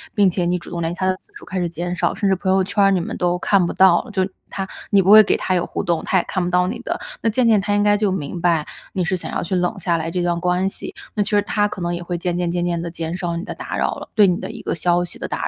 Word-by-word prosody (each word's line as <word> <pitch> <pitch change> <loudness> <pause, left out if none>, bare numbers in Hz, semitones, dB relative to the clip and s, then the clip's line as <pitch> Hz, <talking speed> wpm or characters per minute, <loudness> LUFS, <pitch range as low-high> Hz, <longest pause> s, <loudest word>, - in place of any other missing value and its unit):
并 200 -3 +5
且 180 0 -1
你 175 +1 +1
主 170 - -10
动 170 - -4
联 165 0 -1
系 175 - -11
他 185 - +1
的 185 0 +1
次 405 - -33
数 415 - -12
开 190 -2 -3
始 175 - 0
减 175 +1 -4
少， 180 - 0
甚 205 -2 0
至 190 - +3
朋 185 - -2
友 190 0 +3
圈 195 +2 0
儿 195 - +5
你 185 -2 +2
们 - - -5
都 175 0 +1
看 190 0 +2
不 - - -3
到 190 -2 +5
了， 250 - -11
就 190 -2 +1 0.2
他 195 - -4 0.2
你 200 - +5
不 190 +2 +3
会 215 +1 +11
给 - - +1
他 185 - -1
有 175 -1 +1
互 - - -4
动， 170 -2 0
他 190 - +2
也 180 - +2
看 185 - -2
不 175 - -1
到 180 0 +2
你 230 +5 -4
的， 245 - -3 0.2
那 225 - +2
渐 240 +3 +1
渐 220 -2 +5
他 205 +1 0
应 205 - +2
该 205 0 +4
就 205 -1 +1
明 175 -1 -4
白， 165 -3 +2 0.3
你 185 - 0
是 185 +2 0
想 - - -7
要 - - -1
去 180 +2 -2
冷 180 +4 0
下 170 -2 0
来 165 0 -3
这 180 +1 -2
段 175 -1 0
关 180 +2 +1
系， - - -8 0.2
那 210 - +2
其 - - -4
实 205 -1 +4
他 205 0 +1
可 205 - -7
能 175 0 -1
也 175 - -4
会 175 0 -3
渐 175 0 -2
渐 175 -1 0
渐 175 0 -1
渐 170 -1 -1
地 170 - -4
减 165 0 -4
少 175 -2 -3
你 170 - -4
的 220 - -6
打 - - -5
扰 - - 0
了 - - -9
对 210 -2 +6
你 180 -1 +2
的 - - -6
一 225 -1 -9
个 - - -2
消 175 +2 +1
息 175 - -8
的 - - -4
打 - - -2
180 Hz, 370 characters per minute, -21 LUFS, 175-200 Hz, 0.3 s, 会